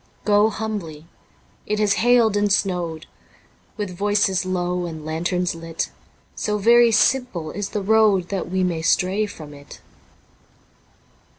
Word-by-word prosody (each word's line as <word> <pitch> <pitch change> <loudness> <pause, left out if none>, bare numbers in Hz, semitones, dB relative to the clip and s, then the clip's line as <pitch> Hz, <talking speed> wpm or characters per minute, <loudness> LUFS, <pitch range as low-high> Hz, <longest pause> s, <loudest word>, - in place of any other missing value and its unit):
Go 210 +1 +4
humbly... 200 -9 -5 0.6
it 210 - -1
has 210 -1 +2
hailed 235 -3 +4
and 205 0 +1
snowed... 175 -5 -1 0.7
With 205 -4 -4
voices 200 -1 +1
low 180 -1 -2
and 160 -2 -8
lanterns 175 +3 -1
lit, 165 0 -5 0.4
So 210 0 -2
very 235 +3 +5
simple 220 -8 +1
is 200 +1 -4
the 210 - -3
road. 210 -3 +3
That 195 -3 -3
we 185 +1 0
may 170 -3 -1
stray 190 +5 +1
from 155 -7 -11
it. 140 0 -13
190 Hz, 130 wpm, -22 LUFS, 170-210 Hz, 0.7 s, very